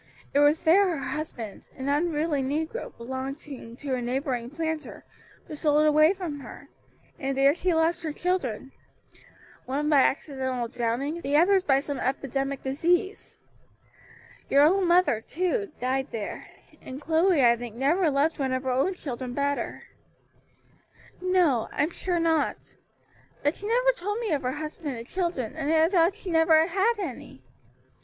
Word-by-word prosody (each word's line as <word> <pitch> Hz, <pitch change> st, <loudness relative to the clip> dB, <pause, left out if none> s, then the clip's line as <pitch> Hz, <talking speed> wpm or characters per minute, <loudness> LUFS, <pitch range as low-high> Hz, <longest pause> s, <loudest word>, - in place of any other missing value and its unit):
it 285 Hz, -, +3 dB
was 290 Hz, +2 st, +4 dB
there 355 Hz, +1 st, +4 dB
her 275 Hz, -, -5 dB
husband 245 Hz, -9 st, -6 dB
an 265 Hz, 0 st, -5 dB
unruly 300 Hz, 0 st, 0 dB
negro 315 Hz, -, -3 dB
belonging 260 Hz, 0 st, -7 dB
to 275 Hz, +1 st, -4 dB
a 250 Hz, -, -1 dB
neighboring 245 Hz, -1 st, -2 dB
planter 320 Hz, +1 st, -5 dB, 0.4 s
was 300 Hz, -, -7 dB
sold 300 Hz, 0 st, +3 dB
away 305 Hz, +2 st, +5 dB
from 355 Hz, -7 st, -5 dB
her, 255 Hz, -, -11 dB, 0.5 s
and 270 Hz, -2 st, -2 dB
there 275 Hz, +1 st, +5 dB
she 355 Hz, +2 st, -1 dB
lost 330 Hz, +1 st, +1 dB
her 320 Hz, -3 st, -3 dB
children, 290 Hz, -, -2 dB, 1.0 s
one 290 Hz, +3 st, -1 dB
by 290 Hz, -3 st, +6 dB
accidental 260 Hz, -3 st, -1 dB
drowning, 245 Hz, +7 st, -2 dB
the 285 Hz, 0 st, +1 dB
others 380 Hz, +4 st, +5 dB
by 270 Hz, -6 st, +3 dB
some 285 Hz, -1 st, -4 dB
epidemic 275 Hz, +1 st, -2 dB
disease. 345 Hz, +9 st, -1 dB, 1.1 s
Your 280 Hz, +1 st, +5 dB
own 365 Hz, +4 st, +4 dB
mother, 345 Hz, -10 st, +3 dB
too, 370 Hz, -, -2 dB
died 265 Hz, +2 st, -1 dB
there, 220 Hz, -4 st, -6 dB, 0.3 s
and 260 Hz, +1 st, -8 dB
Chloe 320 Hz, -1 st, +3 dB
I 235 Hz, 0 st, +6 dB
think 235 Hz, -2 st, -8 dB
never 310 Hz, +7 st, +2 dB
loved 295 Hz, +3 st, +1 dB
one 265 Hz, -2 st, 0 dB
of 260 Hz, +1 st, -1 dB
her 260 Hz, -, -1 dB
own 275 Hz, +10 st, +1 dB
children 255 Hz, -6 st, -6 dB
better." 285 Hz, 0 st, -2 dB, 1.4 s
"No, 355 Hz, -11 st, +2 dB
I'm 305 Hz, +4 st, 0 dB
sure 350 Hz, 0 st, -2 dB
not. 325 Hz, -2 st, 0 dB, 0.7 s
But 290 Hz, +3 st, +1 dB
she 410 Hz, -, -6 dB
never -, -, +3 dB
told 415 Hz, -3 st, -4 dB
me 455 Hz, -5 st, -2 dB
of 290 Hz, -3 st, +1 dB
her 255 Hz, -1 st, -2 dB
husband 300 Hz, -2 st, -5 dB
and 230 Hz, -, -8 dB
children, 335 Hz, -, -3 dB
and 310 Hz, -1 st, -2 dB
I 320 Hz, 0 st, +4 dB
thought 355 Hz, -1 st, +3 dB
she 370 Hz, -, -6 dB
had 325 Hz, -, +3 dB
never 320 Hz, -1 st, +5 dB
had 390 Hz, +6 st, +2 dB
any. 265 Hz, -, -7 dB
295 Hz, 160 wpm, -26 LUFS, 265-340 Hz, 1.4 s, by